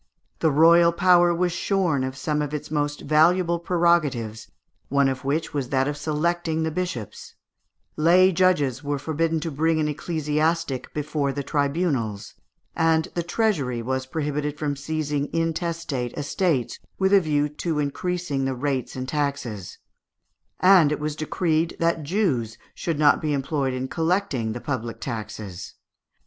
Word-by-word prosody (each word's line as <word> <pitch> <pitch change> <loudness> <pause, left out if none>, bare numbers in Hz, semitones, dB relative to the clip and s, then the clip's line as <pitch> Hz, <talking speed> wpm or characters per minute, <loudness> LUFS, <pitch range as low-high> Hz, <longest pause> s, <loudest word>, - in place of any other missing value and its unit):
The 160 - +3
royal 170 +3 +6
power 175 0 +4
was 175 +1 0
shorn 175 -6 0
of 130 0 -4
some 150 +2 -1
of 150 0 -3
its 150 0 -6
most 145 -1 -1
valuable 170 +3 +3
prerogatives, 155 -11 +1 0.4
one 140 0 +3
of 135 0 -3
which 150 +4 -1
was 135 -4 -2
that 135 0 +1
of 145 - -2
selecting 160 +2 -1
the 160 - -1
bishops; 160 - -5 0.6
lay 180 +4 +5
judges 155 -7 +2
were 145 0 -1
forbidden 160 +3 -1
to 165 - -3
bring 160 +3 +1
an 155 - +1
ecclesiastic 150 -2 -1
before 150 -1 -1
the 140 +1 -4
tribunals; 140 - -1 0.4
and 160 -1 +2
the 175 - -1
treasury 165 - 0
was 130 +2 -2
prohibited 150 0 -2
from 145 -1 -2
seizing 145 0 -2
intestate 165 -6 -2
estates, 145 - -1 0.2
with 190 +1 +2
a 200 - +7
view 150 -3 +1
to 150 +2 -3
increasing 150 0 -2
the 135 -1 -1
rates 130 0 -2
and 130 0 -4
taxes; 140 - -3 0.8
and 180 -5 +6
it 150 - -1
was 150 0 -3
decreed 160 +1 -1
that 165 -1 +1
Jews 140 - -1 0.2
should 165 -3 -3
not 145 -1 +4
be 150 -1 0
employed 135 -1 -1
in 130 +1 -3
collecting 160 - -1
the 120 - -6
public 120 -5 -4
taxes. 105 -4 -6
150 Hz, 150 wpm, -24 LUFS, 135-165 Hz, 0.8 s, a